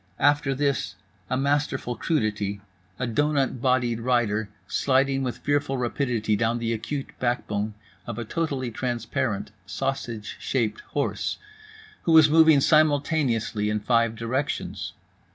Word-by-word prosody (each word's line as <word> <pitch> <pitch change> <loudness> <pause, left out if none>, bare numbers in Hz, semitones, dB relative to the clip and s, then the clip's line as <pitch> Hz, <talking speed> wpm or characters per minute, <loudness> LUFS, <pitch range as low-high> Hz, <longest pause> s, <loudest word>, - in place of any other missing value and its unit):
After 145 -1 +3
this, 140 0 0 0.3
a 130 - 0
masterful 140 -3 0
crudity—a 105 - -3
doughnut 135 0 +1
bodied 125 -3 +2
rider, 115 -3 +1 0.2
sliding 135 0 +2
with 125 -2 -2
fearful 145 -2 0
rapidity 120 -3 0
down 115 +2 +1
the 115 -1 -1
acute 135 +5 -4
backbone 110 -4 -1 0.3
of 115 -2 -5
a 120 - -4
totally 135 -3 -2
transparent 120 -2 -2 0.2
sausage 115 -1 -3
shaped 110 -5 -1 0.2
horse, - - -1 0.6
who 165 - +2
was 155 -2 +7
moving 160 -3 +6
simultaneously 145 -8 +2
in 105 0 0
five 115 +1 +2
directions. 125 +5 -3
125 Hz, 115 wpm, -25 LUFS, 110-140 Hz, 0.6 s, was